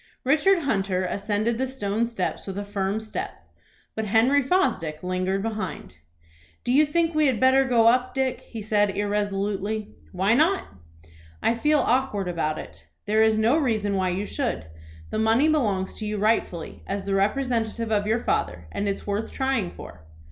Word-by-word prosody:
Richard 320 +6 +3
Hunter 195 -7 0
ascended 210 +5 -1
the 265 - 0
stone 230 -3 -1
steps 215 -5 -3
with 195 0 -5
a 205 - -3
firm 200 0 -1
step, 220 -1 -6 0.5
but 220 - -3
Henry 235 +7 +4
Fosdick 180 - 0
lingered 185 +2 -1
behind. 210 - -5 0.7
"Do - - -1
you 295 +4 +5
think 335 +2 +1
we 310 -1 +3
had 250 -5 +1
better 260 +1 +5
go 240 -3 +3
up, 250 +2 +3
Dick?" 265 -1 0
he 225 -3 -8
said 205 -2 +1
irresolutely. 205 +1 -2 0.2
"Why 190 +3 +2
not?" 325 +9 +3 0.8
"I - - +3
feel 300 +6 +2
awkward 245 -6 0
about 160 -3 -1
it." - - -10 0.2
"There 215 +1 +2
is 220 0 +4
no 225 +7 +3
reason 215 -8 0
why 185 -1 +1
you 190 +3 -2
should. 245 - -3 0.5
The 215 - -1
money 225 +7 +3
belongs 210 -12 +1
to 215 - -4
you 210 0 -2
rightfully, 205 -6 -1
as 200 0 -3
the 200 - -1
representative 225 +1 0
of 205 -1 +1
your 225 +2 +1
father, 85 -2 -1
and 205 - -2
it 200 - 0
is - - -13
worth 205 +2 -2
trying 265 -8 0
for." 80 - -11
215 Hz, 175 wpm, -25 LUFS, 200-255 Hz, 0.8 s, you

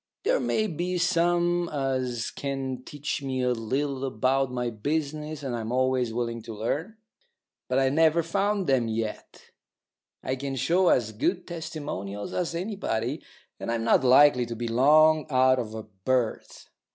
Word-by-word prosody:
There - - +2
may 215 - 0
be 180 -1 -2
some 175 0 +2
as 130 -4 -2
can 135 -2 -4
teach 145 +2 -4
me 130 -2 -2
a 125 - +2
little 130 +4 -2
about 130 +1 +1
my 125 -1 -2
business, 150 +5 -3
and 130 -3 -2
I'm 115 0 -4
always 130 -1 +1
willing 115 0 -3
to 110 0 -8
learn; 150 - -3 0.7
but 130 - 0
I've 135 0 +2
never 160 +2 +4
found 195 +3 0
'em 130 -4 +2
yet. 110 -1 -5 0.7
I 130 - -2
can 135 0 -4
show 175 +8 +2
as 110 -3 +2
good 165 - -1
testimonials 150 - -5
as 170 -2 -2
anybody, 165 - -2 0.4
and - - -3
I'm 115 -1 -1
not 115 - +3
likely 130 -1 +6
to 120 - -5
be 120 +1 -4
long 155 +6 +5
out 130 -1 +4
of 110 -2 -5
a 110 - -5
berth. 110 +4 -2
135 Hz, 155 wpm, -26 LUFS, 120-160 Hz, 0.7 s, likely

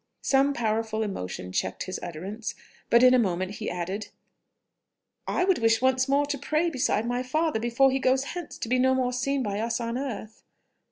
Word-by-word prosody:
Some 275 +1 +3
powerful 220 -1 -1
emotion 90 - -5
checked 95 +1 -2
his 185 - -5
utterance; 195 +7 -5 0.3
but 235 +1 +5
in 255 0 +8
a 255 - +5
moment 185 -2 -1
he 215 - -2
added, 180 +4 -4 1.2
"I - - +1
would 375 -1 +2
wish 225 -1 +3
once 260 +1 +2
more 280 +1 +3
to 285 -1 -3
pray 320 +5 0
beside 245 -5 0
my 245 +1 -1
father 305 0 0
before 240 +4 +3
he 270 - 0
goes 260 0 +2
hence 350 -3 -7
to - - -5
be 255 +2 +2
no 260 +1 +4
more 250 -1 0
seen 275 +2 0
by 205 -2 -2
us 230 +2 -1
on 235 +1 -2
earth." 225 -5 -6
240 Hz, 190 wpm, -27 LUFS, 215-270 Hz, 1.2 s, in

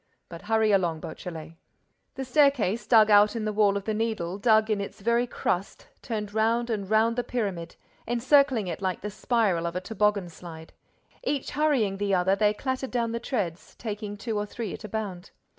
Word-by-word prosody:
—But 170 -1 -9
hurry 220 +1 +2
along, 175 -5 +1
Beautrelet!" 160 0 -8 0.6
The 265 0 -4
staircase, 255 -6 +2
dug 220 -3 +6
out 205 +2 +6
in 225 -2 -2
the 215 - -1
wall 205 -1 +3
of 200 - -5
the 220 - -1
Needle, 210 -4 -2
dug 220 0 +3
in 205 -1 0
its 200 - -7
very 235 +4 +1
crust, 190 -4 -3
turned 210 -4 -4
round 230 +2 +1
and 200 -3 -3
round 220 +2 +3
the 245 - +1
pyramid, 195 -10 -3 0.3
encircling 255 -1 +3
it 175 0 -5
like 185 -2 -2
the 210 - -5
spiral 200 -6 0
of 170 - -5
a - - 0
tobogganslide. 185 -5 -2 0.5
Each 290 - -2
hurrying 265 -10 +1
the 200 -1 +1
other, 185 +2 +2
they 210 0 +3
clattered 260 +4 -3
down 235 -2 -1
the 235 - -2
treads, 200 -9 -4
taking 210 -2 -5
two 220 0 -3
or 205 - -3
three 220 -2 -5
at - - -9
a 210 - -7
bound. 195 -4 -5
210 Hz, 190 wpm, -27 LUFS, 195-230 Hz, 0.6 s, dug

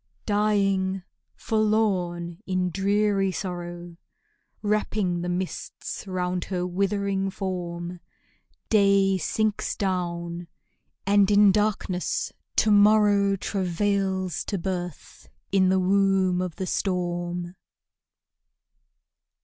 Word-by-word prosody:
Dying, 195 -2 +1 0.3
forlorn, 190 -6 0
in 185 -1 0
dreary 200 +1 +1
sorrow, 175 -2 -6 0.7
Wrapping 205 -4 0
the 175 - -3
mists 180 +2 -5
round 180 -1 -2
her 180 -2 -2
withering 195 +1 0
form, 180 -2 -5 0.7
Day 200 -2 +4
sinks 215 +5 -1
down; 175 -2 -3 0.6
and 200 0 +4
in 205 -1 +6
darkness 200 -3 -1 0.2
to 215 - +3
morrow 205 -1 +5
Travails 190 -1 -1
to 200 - -2
birth 180 -2 -6 0.2
in 190 -1 +4
the 190 0 +3
womb 190 -1 +2
of 180 -3 -4
the 190 - -3
storm. 175 -2 -2
190 Hz, 90 wpm, -25 LUFS, 180-200 Hz, 0.7 s, in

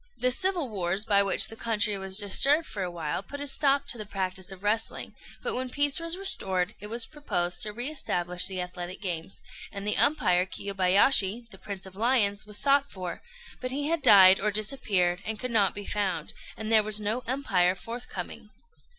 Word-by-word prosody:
] - - -40
The 255 0 +2
civil 365 0 +1
wars 195 -1 -2
by 200 -2 +3
which 200 -1 +2
the 225 - -10
country 215 -2 0
was 190 -1 -1
disturbed 275 +10 +3
for 205 - -7
a 180 - -3
while 165 -1 -4
put 285 +8 -10
a 285 - -4
stop 280 0 +2
to 240 - +6
the 215 - -5
practice 185 -2 -4
of 190 0 -12
wrestling; 220 +2 0 0.3
but - - -1
when 255 0 -4
peace 285 +2 +3
was 335 +1 -2
restored 190 - +1
it 210 - -6
was 230 +2 +1
proposed 180 -13 -3
to 210 - 0
re 240 +5 -1
establish 180 - 0
the 185 -2 -4
athletic 180 0 -7
games, 180 -1 -4 0.3
and 200 0 -7
the 210 - +2
umpire 180 -11 +3
Kiyobayashi, 200 +4 +2
the 190 - -13
"Prince 195 -2 -7
of 190 -1 -11
Lions," 210 -2 +1
was 210 -1 -2
sought 280 +2 +3
for; 185 -2 -7 0.4
but 255 - -4
he 285 +3 -2
had 335 -1 0
died 190 -5 +7
or 210 - 0
disappeared, 200 -5 0
and 220 0 -4
could 250 -1 -4
not 205 -5 +1
be 205 0 -7
found, 200 -4 -3 0.2
and 220 0 -5
there 220 -1 +6
was 215 0 +1
no 215 +4 -2
umpire 195 -9 +1
forthcoming. 235 +6 -8
210 Hz, 200 wpm, -27 LUFS, 190-250 Hz, 0.4 s, died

